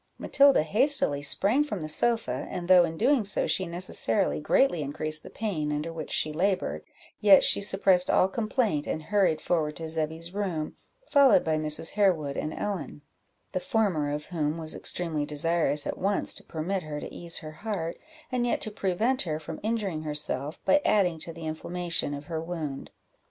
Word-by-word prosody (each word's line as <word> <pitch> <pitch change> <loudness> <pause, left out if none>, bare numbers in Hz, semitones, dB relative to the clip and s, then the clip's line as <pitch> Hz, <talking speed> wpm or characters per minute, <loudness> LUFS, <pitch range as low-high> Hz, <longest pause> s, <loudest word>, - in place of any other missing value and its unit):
Matilda 280 - +4
hastily 215 - +3
sprang 200 - +3
from 210 - -5
the 155 - -4
sofa, 155 - 0
and 175 -1 -5
though 180 -1 +7
in 165 -1 -6
doing 255 - +3
so 200 - +1
she 185 - 0
necessarily 185 +2 0
greatly 175 - +2
increased 155 +2 -3
the - - -11
pain 165 -9 -3
under 150 +3 -3
which 160 -2 -6
she 155 - 0
laboured, 165 - -1 0.4
yet 200 -2 +7
she - - +4
suppressed 195 -2 +3
all 185 - +4
complaint, 215 - -1
and 155 - -3
hurried 190 -4 +1
forward 155 -3 -1
to 165 - -5
Zebby's 160 +2 -3
room, 180 -7 -3 0.3
followed 275 - +5
by 160 -1 0
Mrs. 155 +1 -2
Harewood 175 -9 +1
and 155 - -3
Ellen; 180 -6 -5 0.5
the - - -1
former 180 -9 0
of 150 +1 -4
whom 155 -3 -2
was 160 -1 -3
extremely 165 -4 -2
desirous 150 0 0
at - - -4
once 200 +1 +2
to - - -5
permit 180 +4 -3
her 150 -2 -6
to - - -8
ease 170 -1 -2
her 155 - -7
heart, 170 -2 -5 0.3
and 250 -1 0
yet 240 - 0
to 215 - -1
prevent 215 +6 0
her 155 -4 -3
from 155 0 -8
injuring 210 -7 -2
herself, 150 -1 -2
by 290 - +4
adding 180 -6 +2
to 165 - -5
the 165 0 -9
inflammation 170 -1 -2
of 145 +1 -9
her 160 0 -4
wound. 160 -5 -5
170 Hz, 180 wpm, -27 LUFS, 155-200 Hz, 0.5 s, though